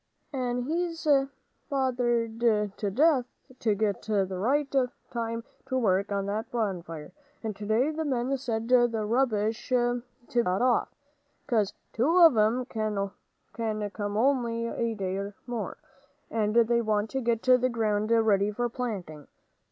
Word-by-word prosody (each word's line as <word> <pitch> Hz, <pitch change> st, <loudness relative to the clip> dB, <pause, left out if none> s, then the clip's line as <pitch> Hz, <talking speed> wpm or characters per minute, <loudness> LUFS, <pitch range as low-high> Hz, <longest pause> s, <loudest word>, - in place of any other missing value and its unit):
"And 250 Hz, -2 st, -1 dB
he's 330 Hz, +4 st, -2 dB
been 275 Hz, -3 st, +3 dB, 0.4 s
bothered 240 Hz, -4 st, 0 dB
to 210 Hz, -3 st, +1 dB
death 265 Hz, +3 st, +3 dB, 0.3 s
to 215 Hz, -3 st, +1 dB
get 205 Hz, -1 st, 0 dB
the 205 Hz, -3 st, +1 dB
right 270 Hz, +10 st, +1 dB, 0.5 s
time 230 Hz, -1 st, -2 dB, 0.2 s
to 260 Hz, -, 0 dB
work 200 Hz, -4 st, +1 dB
on 200 Hz, -1 st, 0 dB
that 210 Hz, +3 st, -2 dB
old -, -, -38 dB
bonfire, 175 Hz, -9 st, -3 dB, 0.3 s
and 215 Hz, -2 st, -3 dB
today 220 Hz, +8 st, +1 dB
the 320 Hz, +1 st, -3 dB
men 265 Hz, -2 st, 0 dB
said 230 Hz, -4 st, -3 dB
the 245 Hz, -1 st, +5 dB, 0.2 s
rubbish 225 Hz, -1 st, 0 dB
ought 245 Hz, -1 st, +2 dB, 0.3 s
to 240 Hz, -, +1 dB
be -, -, +4 dB
got 185 Hz, +3 st, 0 dB
off, 250 Hz, -2 st, +2 dB, 0.6 s
'cause 220 Hz, -7 st, +1 dB, 0.2 s
two 290 Hz, +10 st, +2 dB
of 330 Hz, -7 st, +8 dB
'em 220 Hz, +4 st, +2 dB
can 215 Hz, -4 st, -2 dB, 0.8 s
come 205 Hz, +1 st, -3 dB
only 235 Hz, -2 st, +1 dB
a 230 Hz, 0 st, -2 dB
day 195 Hz, 0 st, -3 dB
more, 240 Hz, -3 st, -4 dB, 0.5 s
and 215 Hz, -1 st, 0 dB
they 235 Hz, 0 st, +4 dB
want 215 Hz, -1 st, 0 dB
to 265 Hz, -, -1 dB
get 230 Hz, -2 st, 0 dB
the 255 Hz, 0 st, +4 dB
ground 215 Hz, -3 st, 0 dB
ready 215 Hz, -3 st, +3 dB
for 240 Hz, +4 st, -1 dB
planting. 195 Hz, -, -5 dB
230 Hz, 150 wpm, -28 LUFS, 210-250 Hz, 0.8 s, of